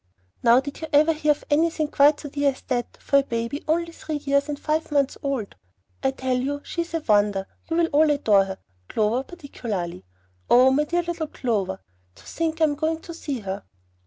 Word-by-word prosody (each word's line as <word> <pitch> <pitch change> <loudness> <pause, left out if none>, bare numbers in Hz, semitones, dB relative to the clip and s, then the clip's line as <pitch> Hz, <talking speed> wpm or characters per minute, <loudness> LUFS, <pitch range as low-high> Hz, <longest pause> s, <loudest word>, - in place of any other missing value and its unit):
Now 240 +1 +6
did 280 +3 -7
you 320 - -4
ever 305 +3 +5
hear 305 -1 -2
of 295 - -2
anything 315 +1 +2
quite 290 +1 +4
so 290 - -7
dear 285 0 +1
as - - -16
that, 245 -2 -2
for 280 - +3
a - - 0
baby 235 +2 -3
only 335 +2 +1
three 315 -1 -5
years 280 0 0
and 290 -1 -3
five 310 +1 -1
months 280 -2 +2
old? 270 -7 -2 0.5
I - - +2
tell 260 -1 -1
you 285 +3 -2
she 340 - -3
is 335 0 -5
a 330 - -1
wonder. 205 -5 +2 0.2
You 330 - 0
will 340 -1 +3
all 305 +1 +5
adore 215 -9 +4
her, 190 0 -6 0.3
Clover 220 +3 +1
particularly. 230 - -6 0.5
Oh, 255 +2 +7
my 295 +3 +2
dear 345 +3 0
little 340 -2 -3
C.! - - -19
To 200 -6 0 0.4
think 320 - -3
I - - +6
am 300 -2 +3
going 320 +2 -1
to 335 - -9
see 285 -6 -4
her! 195 0 -5
285 Hz, 210 wpm, -24 LUFS, 240-315 Hz, 0.5 s, Oh